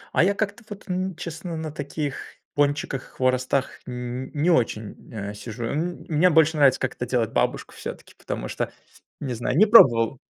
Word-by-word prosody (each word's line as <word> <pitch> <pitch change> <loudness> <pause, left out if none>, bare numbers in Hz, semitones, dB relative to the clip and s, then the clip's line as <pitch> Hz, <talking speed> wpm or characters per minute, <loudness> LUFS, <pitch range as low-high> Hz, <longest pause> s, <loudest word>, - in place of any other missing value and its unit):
А - - +5
я 200 +2 +2
как-то 210 +2 -2
вот 205 0 -9
н 185 0 -1
честно 170 0 -6
на 160 -1 -4
таких 145 -1 -4 0.3
пончиках, 145 -2 0
хворостах 130 +1 0
нь 125 +1 -5
не 160 +5 +3
очень, 115 -6 0 0.2
э, 105 -3 -5
сижу. 115 +3 -6
М 165 +8 -3
мне 165 +3 +4
больше 160 -1 +4
нравится, 140 -3 +5
как 130 - -1
это 125 - -5
делает 120 -3 0
бабушка - - 0
всё-таки, - - -8
потому - - -5
что, - - -3 0.5
не 135 -4 -3
знаю, 120 +3 -1
не 210 - +7
пробовал. 130 - +6
145 Hz, 175 wpm, -24 LUFS, 125-165 Hz, 0.5 s, не